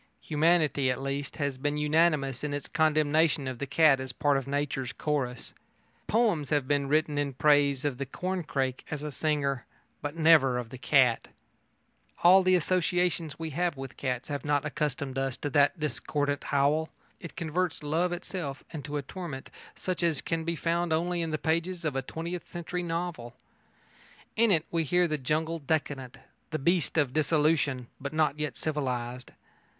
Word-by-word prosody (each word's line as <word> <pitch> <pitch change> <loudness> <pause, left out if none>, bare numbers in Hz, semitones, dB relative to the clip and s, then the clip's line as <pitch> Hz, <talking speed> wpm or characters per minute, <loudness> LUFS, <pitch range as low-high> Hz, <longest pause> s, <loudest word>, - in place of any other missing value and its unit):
Humanity, 155 -3 +2
at 125 - -1
least, 140 +1 -3
has 140 -3 -2
been 145 +2 -1
unanimous 150 -3 +2
in 145 -1 -1
its 145 - -5
condemnation 155 -1 +2
of 130 -2 -5
the 140 - -3
cat 145 -1 +5
as 130 -1 -4
part 145 +2 +1
of 135 -1 -1
nature's 140 -3 -2
chorus. 135 -5 -2 0.5
Poems 205 - +2
have 145 -3 +1
been 140 -1 +1
written 150 0 +1
in 140 -1 -1
praise 145 -1 +3
of 140 -3 -1
the 140 - -3
corncrake 145 -6 -2
as 150 -1 -4
a 150 - -4
singer, 140 -3 0 0.4
but 145 +1 -4
never 155 -6 +5
of 120 -2 -5
the 130 - -8
cat. 125 -3 +3 1.0
All 185 +2 +8
the 185 0 +4
associations 175 -2 0
we 160 -1 -4
have 170 0 -1
with 135 -1 -7
cats 125 -2 -3
have 145 -1 -3
not 145 -1 +1
accustomed 140 -3 -2
us 135 -1 -1
to 145 - -4
that 145 +5 +3
discordant 145 0 -2
howl. 145 +3 +2 0.3
It 170 - -9
converts 170 0 -1
love 165 +5 +1
itself 175 -5 -5
into 150 -2 -4
a 145 - -3
torment 150 -3 -7 0.2
such 185 -1 -3
as 165 -5 +2
can 165 -1 -2
be 170 +1 -1
found 170 +2 0
only 170 +2 +1
in 165 - -2
the 155 - -1
pages 170 +3 -1
of 150 -4 -1
a 135 - 0
twentieth 165 +6 -6
century 175 +1 -4
novel. 165 -8 -4 1.0
In 230 0 +4
it 165 -5 +3
we 165 -1 +1
hear 175 +4 +2
the 155 -2 -2
jungle 160 +5 -1
decadent 140 -4 -2 0.3
the 155 - -2
beast 170 +2 +1
in 140 -5 +2
dissolution, 150 -4 +2
but 140 +1 -5
not 155 -1 +1
yet 150 -3 -3
civilised. 125 -5 -3
150 Hz, 170 wpm, -29 LUFS, 135-165 Hz, 1.0 s, All